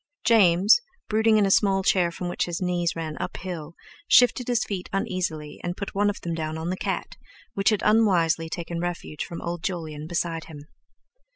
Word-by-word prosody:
James, 200 - +5 0.3
brooding 220 0 +3
in 210 - +4
a 195 - +1
small 195 -1 +3
chair 180 -2 +3
from 175 +1 -6
which 175 - -1
his 170 -2 -4
knees 175 -2 0
ran 160 -2 -4
uphill, 170 -3 -6 0.3
shifted 245 0 +5
his 245 -2 +1
feet 190 -3 -5
uneasily, 170 -6 -3
and 175 +1 -3
put 200 - -5
one 205 +1 +2
of 205 - -4
them 170 - -3
down 160 -1 -3
on 165 +2 -3
the - - -1
cat, - - -4 0.4
which 195 0 +2
had 210 -2 0
unwisely 180 -7 +3
taken 170 0 -4
refuge 175 -3 -4
from 170 - -7
old 170 0 -4
Jolyon 160 -4 -4
beside 165 -1 -2
him. 145 -2 -11
175 Hz, 185 wpm, -25 LUFS, 165-195 Hz, 0.4 s, James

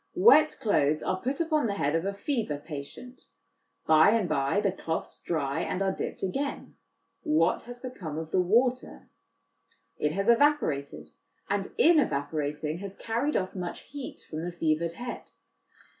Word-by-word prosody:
Wet 330 -6 +6
cloths 155 - +2
are 185 0 -1
put 270 +2 -2
upon 310 -5 +1
the 200 - -2
head 145 -6 0
of 165 +2 0
a 200 - -1
fever 215 - -2
patient; 150 - -9 0.6
by 155 +3 +6
and 215 -3 +2
by 140 +4 +1
the 200 -2 +1
cloths 165 -3 -4
dry, 155 -2 -1
and 180 - -2
are 190 - +1
dipped - - -5
again: 275 +9 -3 0.5
what 165 +3 +2
has 245 - -7
become 220 - -7
of 160 0 -5
the 185 - +3
water? 245 +7 +1 0.9
It 150 0 0
has 195 +3 -1
evaporated, 235 - +2 0.4
and, 200 -1 -1
in 330 -1 +6
evaporating, 150 - -2
has 200 0 -7
carried 235 +7 -1
off 185 -1 -1
much 180 -2 -5
heat 285 -2 -8
from 155 - -5
the 175 - -3
fevered 165 0 0
head. 245 +7 -7
185 Hz, 160 wpm, -28 LUFS, 155-245 Hz, 0.9 s, Wet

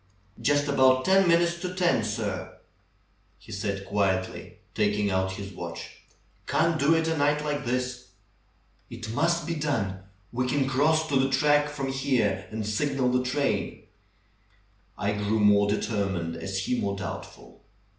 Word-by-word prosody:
"Just 145 0 +2
about 130 -2 +4
ten 190 0 +5
minutes 170 0 +3
to 180 +1 -5
ten, 175 -10 +2
sir," 105 -3 -4 0.8
he - - -15
said 100 -1 -3
quietly, 95 -2 -1 0.2
taking 105 -1 +1
out 95 0 0
his 100 0 -7
watch. - - -7 0.5
"Can't 165 0 +2
do 150 +4 +4
it 160 0 +1
a 160 - +1
night 145 0 +1
like 145 -2 -2
this." 125 0 -2 0.8
"It 115 -1 -7
must 170 +5 +1
be 170 - -2
done! 115 -12 -1 0.3
We 125 +1 -1
can 135 0 +1
cross 155 +4 +2
to 140 - +2
the 135 0 +2
track 145 +2 +3
from 140 -2 -4
here 130 -7 0
and 110 -1 -4
signal 130 +4 0
the 125 0 +1
train." 140 +3 -1 1.1
I 100 0 0
grew 105 +1 0
more 100 -1 +5
determined 95 -6 -1
as 95 +4 -3
he 125 - 0
more 100 0 -1
doubtful. 95 -3 -8
125 Hz, 150 wpm, -27 LUFS, 100-145 Hz, 1.1 s, ten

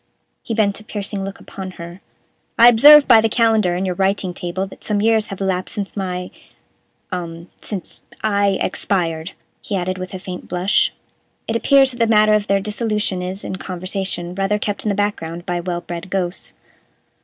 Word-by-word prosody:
He 230 - -4
bent 205 -2 +1
a - - -13
piercing 205 -2 -4
look 195 0 -6
upon 190 -1 -8
her. 170 +2 -9 0.6
"I 235 +1 +9
observe 290 +5 +8
by 230 -3 +7
the 225 - +1
calendar 220 -6 +2
on 185 +2 -1
your 185 - -1
writing 190 0 0
table 175 +2 -3
that 190 - -13
some 210 -1 0
years 220 0 +2
have 195 - -7
elapsed 185 -1 -2
since 200 -2 -4
my 180 -2 -4 0.8
um 170 -1 -6
since 195 -5 -7 0.2
I 200 -2 +2
expired," 170 -2 -1 0.3
he 205 - -4
added, 185 0 -2
with 185 +1 -6
a - - -3
faint 180 -1 -8
blush. 180 +3 +2 0.6
It 225 - -1
appears 270 +3 +4
that 245 - -9
the 230 - +3
matter 215 -1 +5
of 210 -1 +1
their 195 0 +2
dissolution 210 -2 -1
is, 185 +2 -5
in 190 - -4
conversation, 185 -1 -3
rather 195 +2 0
kept 205 -1 -3
in - - +1
the 200 - 0
background 175 -4 -2
by 175 -2 -2
well 175 0 -3
bred 175 +2 -7
ghosts. 185 -1 -2
195 Hz, 185 wpm, -20 LUFS, 180-210 Hz, 0.8 s, I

